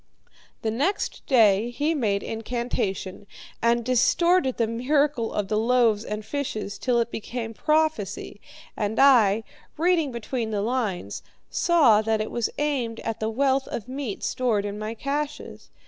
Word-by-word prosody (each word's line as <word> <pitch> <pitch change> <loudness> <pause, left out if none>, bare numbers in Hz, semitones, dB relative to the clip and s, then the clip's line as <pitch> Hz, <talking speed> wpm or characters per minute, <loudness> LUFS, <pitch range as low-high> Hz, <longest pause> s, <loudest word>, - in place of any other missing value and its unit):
The 220 - 0
next 290 - -1
day 220 -3 +4
he 295 +6 0
made 210 -9 0
incantation, 225 -4 -3 0.3
and 235 0 +2
distorted 265 +4 +3
the 230 - +2
miracle 255 +2 0
of 205 -2 -2
the 215 +1 0
loaves 230 -2 +3
and 210 -1 -5
fishes 220 -6 -4
till 245 -2 +1
it 235 0 -1
became 225 0 -5
prophecy, 305 -10 -1 0.3
and 210 +1 -2
I, 225 -6 +5 0.3
reading 330 -3 +2
between 235 0 -3
the 205 -2 -1
lines, 215 - -2 0.3
saw 280 -12 +4
that 220 0 0
it 215 - -3
was 235 -2 -1
aimed 265 -6 -1
at 225 -1 -4
the 220 - -1
wealth 265 +3 +1
of 230 - -5
meat 260 -5 -5
stored 225 -5 0
in 205 0 -5
my 215 +1 -4
caches. 285 +4 -4
235 Hz, 145 wpm, -25 LUFS, 215-275 Hz, 0.3 s, I